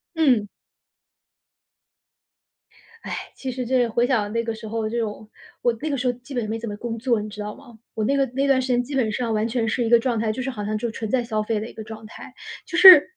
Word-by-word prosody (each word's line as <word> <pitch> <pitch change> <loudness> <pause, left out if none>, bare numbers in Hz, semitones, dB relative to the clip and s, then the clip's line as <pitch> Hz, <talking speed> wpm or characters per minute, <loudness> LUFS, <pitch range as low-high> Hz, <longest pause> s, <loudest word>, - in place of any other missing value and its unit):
嗯。 260 -10 +3 2.5
哎。 - - -5 0.2
其 265 - -4
实 250 0 -4
这 250 0 +2
回 235 +1 +1
想 215 -6 +1
那 230 0 0
个 230 -1 -2
时 220 0 -9
候 220 0 -2
这 235 +2 -2
种 215 -1 -4 0.3
我 240 - +2
那 310 - -2
个 280 - -1
时 255 0 -1
候 245 - +2
基 250 +3 -12
本 235 -4 -2
没 225 +1 -2
怎 230 - -6
么 205 - -5
工 230 +1 -4
作， 235 -2 +1
你 215 - -6
知 210 0 -10
道 210 0 -5
吗？ 245 -5 -15 0.2
我 220 - -2
那 275 +6 +2
个 275 - +3
那 275 +2 +1
段 270 -1 +4
时 255 - -3
间 245 -1 +2
基 275 +3 -6
本 235 -5 +1
上 230 +1 -1
完 215 +1 +1
全 230 -1 -1
是 240 +3 0
一 225 - -1
个 235 0 +7
状 235 -1 0
态， 220 0 0
就 230 - -4
是 265 - -2
好 210 -6 -5
像 215 +1 -1
就 235 +2 -2
纯 220 -1 -5
在 250 +1 +1
消 220 -2 -1
费 215 0 -1
的 215 - -5
一 - - -13
个 220 - -8
状 220 0 -9
态。 215 - -11 0.3
就 - - -3
是 370 -7 +11
230 Hz, 285 characters per minute, -23 LUFS, 220-255 Hz, 2.5 s, 是